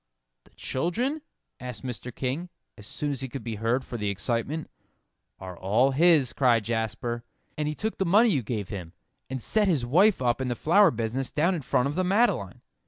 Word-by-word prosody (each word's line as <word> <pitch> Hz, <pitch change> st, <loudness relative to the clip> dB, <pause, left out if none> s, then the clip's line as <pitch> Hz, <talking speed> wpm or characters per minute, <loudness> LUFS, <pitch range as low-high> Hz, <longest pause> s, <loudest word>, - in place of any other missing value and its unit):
"The -, -, -21 dB
children?" 240 Hz, -, -2 dB, 0.4 s
asked 125 Hz, -5 st, -6 dB
Mr. 125 Hz, 0 st, -5 dB
King, 140 Hz, +7 st, -3 dB, 0.3 s
as 105 Hz, -, -11 dB
soon 145 Hz, +5 st, -3 dB
as 135 Hz, -2 st, -4 dB
he 135 Hz, -, -4 dB
could 135 Hz, -, -7 dB
be 115 Hz, -2 st, -4 dB
heard 115 Hz, +5 st, 0 dB
for 120 Hz, -, -6 dB
the 105 Hz, -2 st, -1 dB
excitement. 115 Hz, -, -2 dB, 0.7 s
"Are 95 Hz, -1 st, -8 dB
all 110 Hz, +10 st, +2 dB
his," 150 Hz, -3 st, +4 dB
cried 120 Hz, -5 st, +3 dB
Jasper, 115 Hz, +1 st, -2 dB, 0.3 s
"and 150 Hz, -1 st, -2 dB
he 150 Hz, -, -2 dB
took 220 Hz, +6 st, -3 dB
the -, -, +3 dB
money 215 Hz, +7 st, +5 dB
you 145 Hz, -10 st, +1 dB
gave 105 Hz, -4 st, -4 dB
him, 90 Hz, -5 st, -7 dB, 0.4 s
and 130 Hz, 0 st, -3 dB
set 210 Hz, -, +1 dB
his 150 Hz, -10 st, +1 dB
wife 185 Hz, -, +4 dB
up 125 Hz, 0 st, +1 dB
in 130 Hz, -, -1 dB
the 120 Hz, -, -1 dB
flower 180 Hz, -, +5 dB
business 120 Hz, +1 st, -2 dB
down 170 Hz, +5 st, +1 dB
in 170 Hz, -, -3 dB
front 125 Hz, 0 st, +1 dB
of 140 Hz, -, -3 dB
the 185 Hz, +4 st, 0 dB
Madeleine. 205 Hz, +7 st, +1 dB
130 Hz, 200 wpm, -27 LUFS, 115-170 Hz, 0.7 s, money